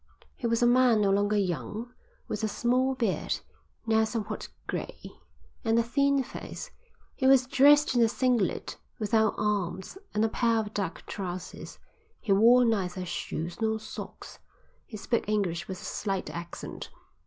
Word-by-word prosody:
He 240 - -2
was 230 +1 +1
a - - +6
man 245 -2 +5
no 200 -1 +3
longer 205 +1 +2
young, 205 +5 -3 0.3
with - - -4
a - - +2
small 255 +5 +1
beard, 230 -6 -1 0.5
now 220 -1 +3
somewhat 220 -1 -3 0.2
grey, - - -5 0.6
and 225 -1 +2
a 235 - +4
thin 280 +3 +2
face. - - -8 0.4
He 260 - +1
was 265 -1 +6
dressed 290 +3 +5
in 240 - +3
a 230 - +6
singlet, 240 -4 0 0.2
without 220 0 +2
arms, 200 - -2 0.2
and 215 +1 +3
a - - +1
pair 230 0 +1
of 215 -1 -2
duck 195 -4 -3
trousers. 185 -2 -6 0.4
He 220 - -3
wore 235 +5 +6
neither 185 -5 0
shoes 170 +1 -4
nor 220 0 +1
socks. 220 - -9 0.5
He 215 - -8
spoke 225 +1 -1
English 190 -6 0
with 185 -2 -6
a - - -10
slight 195 -3 -3
accent. 170 0 -7
220 Hz, 155 wpm, -28 LUFS, 195-245 Hz, 0.6 s, a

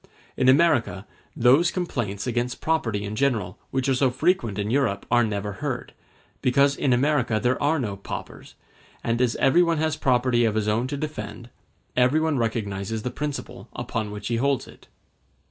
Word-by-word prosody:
In 130 - +3
America 130 - +3 0.3
those 135 +8 +5
complaints 120 - -3
against 120 0 -2
property 115 -11 0
in 105 +1 -4
general 110 -9 0
which 130 0 -1
are 135 - +3
so 130 +1 +3
frequent 125 - 0
in 105 +1 -2
Europe 120 -7 0
are 120 0 +5
never 105 -2 -2
heard, - - -4 0.5
because 140 +2 +3
in 135 - 0
America 125 -3 +2
there 125 +2 0
are 150 +3 +2
no 110 -8 -2
paupers; 100 - -8 0.5
and 115 +1 0
as 125 -2 +2
everyone 170 +3 +3
has 155 0 0
property 125 -2 +2
of 110 -2 +1
his 110 -1 0
own 110 +4 +1
to 140 +2 -4
defend, 120 -6 -6 0.4
everyone 145 +4 +2
recognizes 110 -2 -2
the 125 - -3
principle 145 +2 -5
upon 110 -2 -3
which 105 +1 -6
he 115 - 0
holds 135 +1 0
it. - - -16
125 Hz, 165 wpm, -24 LUFS, 110-140 Hz, 0.5 s, those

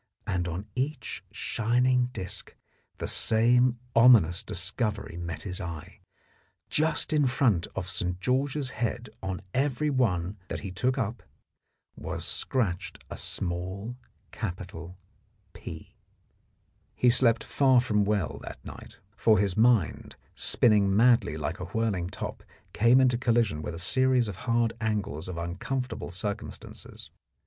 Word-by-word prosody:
And 90 -2 -1
on 90 +4 -4
each 140 +5 -3
shining 125 +2 +1
disc 100 -5 -5 0.4
the - - -4
same 120 +2 +3 0.2
ominous 115 -8 +6
discovery 100 0 -2
met 85 -1 -5
his 95 0 -3
eye: 85 -4 -7 0.7
just 155 +1 +2
in 145 -3 +3
front 120 -9 +2
of 90 - -3
St. 90 0 -2
George's 130 +5 0
head 115 -1 -3
on 95 -1 -4
every 145 +2 +1
one 100 -7 0
that - - -4
he 100 - -5
took 125 +8 0
up 115 -2 -2 0.7
was - - -4
scratched 95 -8 -2
a - - -4
small 95 +6 -4 0.4
capital 90 -4 -6 0.3
" 100 -3 -40
P." - - -9 1.0
He 125 - +4
slept 115 -3 +3
far 130 -3 +4
from 105 -4 +1
well 100 -7 -1
that - - -8
night, - - -10 0.2
for 110 -2 +4
his 100 -1 +1
mind, 110 - +2 0.2
spinning 105 -4 +3
madly 115 -8 +4
like 80 +5 -3
a - - -4
whirling 105 -6 -1
top, - - -6 0.3
came 120 +4 +5
into 125 -2 +3
collision 115 -10 +1
with 80 - -5
a - - -7
series 130 +5 +2
of 100 -3 -6
hard 115 -1 +2
angles 100 -8 -2
of 90 - -5
uncomfortable 110 +9 -3
circumstances. 100 +4 -6
110 Hz, 135 wpm, -28 LUFS, 90-125 Hz, 1.0 s, ominous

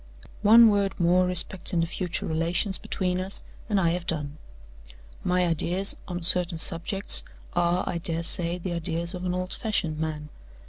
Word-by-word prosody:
"One 225 +3 +6
word 200 -1 -2
more 180 +1 +2
respecting 180 0 0
the - - 0
future 180 +1 -5
relations 170 +5 -2
between 180 -1 -3
us, 190 +1 -3 0.3
and 205 -2 +1
I 170 -3 +1
have 175 0 -5
done. 150 -2 -4 0.8
My 180 0 0
ideas 175 +3 +1
on 175 -1 -6
certain 175 0 +1
subjects 170 +5 +2 0.3
are, 175 +1 0
I 170 - -3
dare 165 -1 0
say, 170 +1 +7
the 180 0 -6
ideas 170 +1 -1
of 180 0 -7
an 180 0 -2
old 185 0 -4
fashioned 165 -8 -3
man. 155 -1 -5
175 Hz, 165 wpm, -24 LUFS, 165-185 Hz, 0.8 s, say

